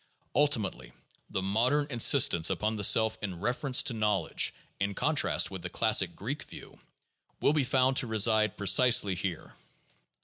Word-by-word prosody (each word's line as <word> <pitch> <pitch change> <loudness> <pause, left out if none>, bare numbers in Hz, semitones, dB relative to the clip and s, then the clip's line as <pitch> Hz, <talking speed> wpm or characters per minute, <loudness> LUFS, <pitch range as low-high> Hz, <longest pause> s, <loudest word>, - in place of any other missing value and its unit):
Ulti 145 -2 +2
mately 60 - -7 0.4
the 95 - -4
modern 120 +9 0
insistence 90 -8 +3
upon 105 +4 -2
the 105 - -5
self 110 +2 +3
in 95 -4 -6
reference 125 +5 0
to 125 - -2
knowledge 105 -6 0 0.3
(in 100 0 -3
contrast - - 0
with 95 -2 -8
the 90 - -6
classic 95 -5 +1
Greek 135 - -6
view) - - -13 0.6
will 145 - +1
be 150 -2 0
found 130 0 +1
to 130 - 0
reside 110 0 +1
pre 100 - -7
cisely 115 -3 +4
here. 90 -2 -6
110 Hz, 160 wpm, -28 LUFS, 95-125 Hz, 0.6 s, cisely